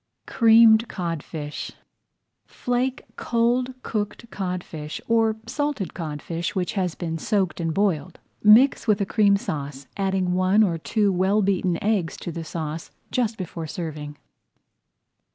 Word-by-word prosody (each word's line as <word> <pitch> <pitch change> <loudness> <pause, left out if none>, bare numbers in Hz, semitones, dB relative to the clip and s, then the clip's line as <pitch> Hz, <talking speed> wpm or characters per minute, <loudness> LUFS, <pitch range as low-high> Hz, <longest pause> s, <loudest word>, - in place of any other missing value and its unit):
CREAMED 225 0 +6
CODFISH 165 -5 -5 0.7
Flake 250 +1 -2
cold 245 +2 +1
cooked 215 +2 -4
codfish, 180 -5 -5
or 225 -1 +3
salted 275 -4 -2
codfish 165 +1 -4
which 180 -2 -1
has 185 -5 -1
been 165 -2 -4
soaked 190 0 0
and 165 -1 -1
boiled. 175 -3 0 0.2
Mix 230 +5 +6
with 210 -2 +3
a 200 - +1
Cream 200 0 +3
Sauce, 145 -8 -5
adding 190 -2 0
one 185 +4 +4
or 170 -5 0
two 205 +4 +1
well 190 +3 +2
beaten 185 -3 +1
eggs 200 -6 0
to 175 - -6
the 165 0 -5
sauce 160 0 -5 0.2
just 230 -3 0
before 170 -3 -5
serving. 150 -3 -6
190 Hz, 130 wpm, -24 LUFS, 165-220 Hz, 0.7 s, CREAMED